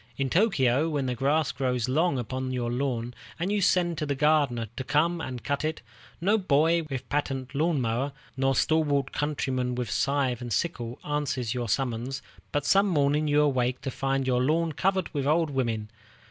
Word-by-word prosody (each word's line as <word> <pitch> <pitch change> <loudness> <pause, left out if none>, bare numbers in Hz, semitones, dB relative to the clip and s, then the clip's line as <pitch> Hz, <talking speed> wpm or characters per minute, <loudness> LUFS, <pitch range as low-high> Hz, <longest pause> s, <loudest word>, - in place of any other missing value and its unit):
In 135 -1 -1
Tōkyō, 160 - +3
when 145 -4 -1
the 125 - -1
grass 140 +5 +1
grows 125 -2 -1
long 150 +3 +2
upon 130 +2 -3
your 120 -2 -2
lawn, 120 -2 -2 0.3
and 180 +4 -1
you 205 -1 +1
send 175 -2 +2
to 150 - -1
the 140 - 0
gardener 140 -6 +2
to 130 - -4
come 165 +5 +1
and 125 -5 -5
cut 140 +3 -1
it, 155 +1 -2 0.4
no 205 +6 +2
boy 165 -1 +3
with 135 -3 -5
patent 135 -2 -2
lawn 155 +1 +1
mower, 125 +4 -1 0.2
nor 135 0 +1
stalwart 145 -2 +2
countryman 130 -4 -1
with 120 -3 -3
scythe 135 -3 0
and 120 -1 -5
sickle, 120 - -2
answers 135 -6 -1
your 120 -3 -3
summons, 125 +2 -2 0.3
but 145 -1 -1
some 195 +5 +4
morning 150 -3 +2
you 145 0 +4
awake 130 -3 +1
to 135 - -3
find 135 0 -1
your 125 -1 +2
lawn 160 +5 +1
covered 190 +3 0
with 140 -2 -1
old 160 0 +2
women. 115 -5 -1
140 Hz, 185 wpm, -27 LUFS, 125-155 Hz, 0.4 s, some